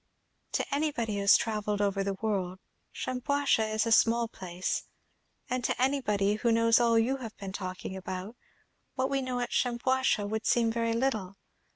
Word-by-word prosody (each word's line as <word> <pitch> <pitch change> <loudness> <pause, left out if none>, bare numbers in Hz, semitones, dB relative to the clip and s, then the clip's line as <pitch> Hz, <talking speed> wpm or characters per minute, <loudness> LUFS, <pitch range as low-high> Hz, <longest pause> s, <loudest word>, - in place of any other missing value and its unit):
"To - - 0
anybody 280 -7 -1
who - - -1
has 200 0 +7
travelled 210 -2 -2
over 200 -1 +1
the 195 0 -2
world, 190 -3 -2 0.3
Shampuashuh 255 -3 0
is 215 +1 +1
a 230 - -1
small 230 +1 +4
place; 185 -4 -4 0.6
and 250 0 -2
to - - -1
anybody 210 -7 +1
who 235 +2 +1
knows 230 0 +4
all 235 -1 +3
you 245 +4 +2
have 230 -5 -8
been 195 -1 -7
talking 185 -1 -5
about, 190 +3 -6 0.6
what 260 +1 0
we 275 -1 +1
know 255 -1 -2
at 240 - -3
Shampuashuh 245 -3 +1
would 220 +1 -3
seem 230 -2 +3
very 230 0 0
little. 220 -6 -1
225 Hz, 170 wpm, -29 LUFS, 200-250 Hz, 0.6 s, has